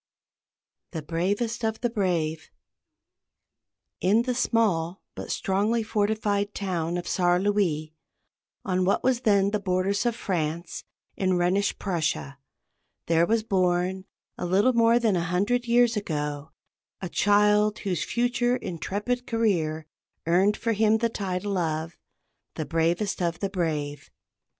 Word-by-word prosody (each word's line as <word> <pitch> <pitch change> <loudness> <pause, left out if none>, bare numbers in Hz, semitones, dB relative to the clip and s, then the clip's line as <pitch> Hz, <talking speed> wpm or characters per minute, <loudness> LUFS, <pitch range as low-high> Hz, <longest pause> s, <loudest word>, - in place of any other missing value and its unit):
"THE 160 -3 -4
BRAVEST 205 +9 -1
OF 220 0 -1
THE 240 - +1
BRAVE." 165 -7 -1 1.5
In 210 +6 +3
the 250 0 -1
small 200 -8 0
but - - -7
strongly 210 +4 0
fortified 210 -1 0
town 175 -3 -2
of 175 - -5
Saar 175 -1 +2
Louis, 180 -6 0 0.7
on 185 -3 +1
what 190 +2 +1
was 255 -2 +2
then 200 -4 +3
the 210 - 0
borders 195 +3 0
of 235 - 0
France, 170 -4 -3 0.3
in 185 -2 +1
Rhenish 185 +3 +1
Prussia, 155 -7 -2 0.7
there 165 +1 +3
was 225 0 +1
born, 185 -1 0 0.3
a - - -2
little 200 +8 +3
more 230 0 +4
than 225 -5 +2
a 175 - +1
hundred 205 +8 0
years 240 0 +4
ago, 150 -6 -3 0.5
a 185 - -4
child 210 +2 +3
whose 185 -4 -2
future 245 0 +1
intrepid 210 +6 -3
career 170 -9 0 0.4
earned 185 +5 +3
for 230 0 0
him 220 +1 +3
the 230 +1 0
title 195 -2 -2
of 160 -1 -2 0.6
"the 155 - -3
bravest 170 +6 0
of 170 -1 0
the 195 -1 -2
brave." 150 -6 -3
195 Hz, 130 wpm, -26 LUFS, 170-220 Hz, 1.5 s, more